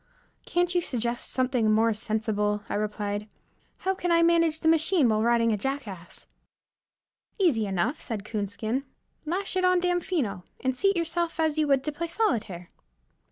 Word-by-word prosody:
"Can't 350 0 +1
you 355 - +2
suggest 240 -5 -2
something 250 -4 +1
more 225 +1 +3
sensible?" 210 -1 -1
I - - -4
replied. 210 0 -2 0.5
"How 380 - 0
can 355 -2 -2
I 335 0 +5
manage 335 -2 +3
the - - 0
machine 320 -2 +4
while 215 -1 +2
riding 230 0 +3
a 210 - +1
jackass?" 205 -7 -5 1.1
"Easy 280 - +2
enough," 195 - -1
said 215 -4 -4
Coonskin. 215 +4 -2 0.4
"Lash 375 +4 -2
it 370 - +1
on 365 0 +4
Damfino, 350 - -1 0.2
and 260 -1 -1
seat 395 +6 +2
yourself 335 0 -1
as 315 -1 +1
you 305 - +2
would 275 -2 +3
to 300 - -2
play 335 +3 -4
solitaire." 220 - -1
260 Hz, 160 wpm, -27 LUFS, 215-335 Hz, 1.1 s, I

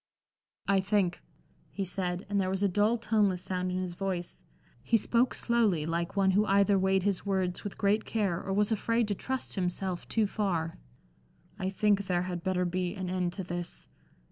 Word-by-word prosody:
"I 200 -1 +4
think," 190 -2 +1 0.5
he 195 - -3
said, 180 -1 -2
and 200 0 +1
there 185 - 0
was 190 +1 -1
a - - +5
dull, 210 +5 +2
toneless 210 -5 +1
sound 185 0 -2
in 180 - -1
his 185 -1 -2
voice; 180 -1 -4 0.4
he 230 - +3
spoke 235 +3 +1
slowly, 215 -10 +2
like 170 +3 -2
one 195 -1 +4
who 205 +3 +4
either 200 0 +4
weighed 190 0 +2
his 200 -2 0
words 190 -3 -1
with 205 - -6
great 210 +1 +2
care, 195 -6 -1
or 195 - -4
was 205 +2 +2
afraid 230 +1 +1
to - - +2
trust 260 +7 -3
himself 180 -1 -2
too 220 -2 +2
far, 180 -6 -1 0.8
"I 190 -1 -1
think 200 0 +2
there 175 -1 +1
had 180 -2 -4
better 185 -1 +1
be 180 +1 -1
an 185 -2 -4
end 180 -1 -1
to 190 - -4
this. 175 -1 -5
190 Hz, 190 wpm, -30 LUFS, 180-205 Hz, 0.8 s, a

